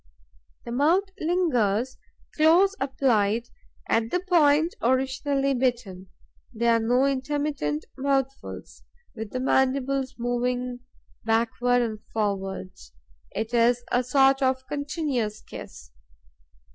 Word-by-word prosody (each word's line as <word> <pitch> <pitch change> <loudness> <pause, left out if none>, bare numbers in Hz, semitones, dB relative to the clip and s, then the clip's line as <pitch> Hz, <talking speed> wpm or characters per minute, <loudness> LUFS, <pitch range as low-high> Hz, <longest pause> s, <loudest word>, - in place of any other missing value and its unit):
The 235 - -6
mouth 335 +10 +2
lingers, 260 - 0 0.4
close 345 +6 +4
applied, 240 -4 +1 0.4
at 225 0 +1
the 360 - 0
point 330 -3 +3
originally 270 +2 +1
bitten. 240 -8 -2 0.4
There 235 0 +2
are 230 - +3
no 245 +4 +2
intermittent 275 - -1
mouthfuls, 270 0 -2 0.3
with 220 -2 -6
the 255 - -4
mandibles 265 0 +1
moving 245 +1 -2 0.4
backwards 235 +2 +1
and 215 -2 -5
forwards. 190 - -4 0.4
It 220 +3 -4
is 240 +1 +3
a 245 - +2
sort 270 +2 +3
of 260 0 +1
continuous 285 -7 -2
kiss. - - -11
255 Hz, 105 wpm, -25 LUFS, 230-275 Hz, 0.4 s, close